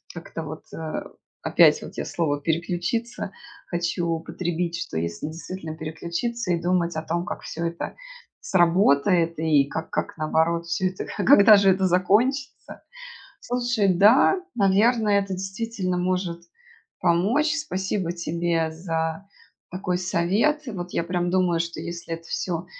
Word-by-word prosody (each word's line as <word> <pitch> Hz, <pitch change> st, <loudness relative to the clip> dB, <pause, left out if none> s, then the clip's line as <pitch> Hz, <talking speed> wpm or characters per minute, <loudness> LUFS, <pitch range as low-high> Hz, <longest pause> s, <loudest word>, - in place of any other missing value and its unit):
как-то, 165 Hz, -1 st, -7 dB
вот, 155 Hz, 0 st, -9 dB
а, 160 Hz, -1 st, -4 dB, 0.4 s
опять, -, -, +5 dB
вот, -, -, -10 dB
я -, -, -3 dB
слово 145 Hz, -4 st, -1 dB
"переключиться" 175 Hz, +8 st, -2 dB, 0.4 s
хочу 175 Hz, 0 st, -1 dB
употребить, 170 Hz, +1 st, -2 dB
что 125 Hz, -, -5 dB
если 85 Hz, -, -3 dB
действительно, 160 Hz, 0 st, -7 dB
переключиться, 170 Hz, +7 st, -3 dB
и 170 Hz, -, +1 dB
думать 175 Hz, -1 st, 0 dB
о 160 Hz, -, -3 dB
том, 170 Hz, +2 st, -2 dB
как -, -, -5 dB
всё 170 Hz, -, -5 dB
это 170 Hz, 0 st, -5 dB, 0.4 s
сработает, 170 Hz, -, +3 dB
и 150 Hz, -4 st, +3 dB
как 160 Hz, +3 st, -5 dB
как -, -, -3 dB
наоборот 165 Hz, +2 st, +1 dB
всё 185 Hz, +2 st, 0 dB
это 185 Hz, -, -5 dB
а -, -, -1 dB
когда 215 Hz, -6 st, +8 dB
же 195 Hz, -1 st, +4 dB
это 190 Hz, 0 st, +3 dB
закончится? 225 Hz, -, 0 dB, 0.6 s
Слушай, 240 Hz, -4 st, 0 dB
да, 225 Hz, -, +5 dB
наверно, 215 Hz, +2 st, +3 dB
это, 200 Hz, -1 st, +1 dB
действительно, 195 Hz, -1 st, -3 dB
может 180 Hz, -1 st, -1 dB, 0.6 s
помочь. 225 Hz, -, +2 dB
Спасибо 190 Hz, -, -2 dB
тебе 170 Hz, -1 st, -1 dB
за 160 Hz, +1 st, -3 dB, 0.4 s
такой 180 Hz, -1 st, -2 dB
совет. 200 Hz, -, +1 dB
И -, -, -4 dB
вот 180 Hz, -2 st, -6 dB
я, -, -, +1 dB
прям, 175 Hz, 0 st, -1 dB
думаю, 180 Hz, -3 st, +2 dB
что 170 Hz, 0 st, -3 dB
если 170 Hz, -1 st, -5 dB
это 165 Hz, -, -9 dB
всё 170 Hz, -2 st, -3 dB
175 Hz, 140 wpm, -24 LUFS, 165-195 Hz, 0.6 s, когда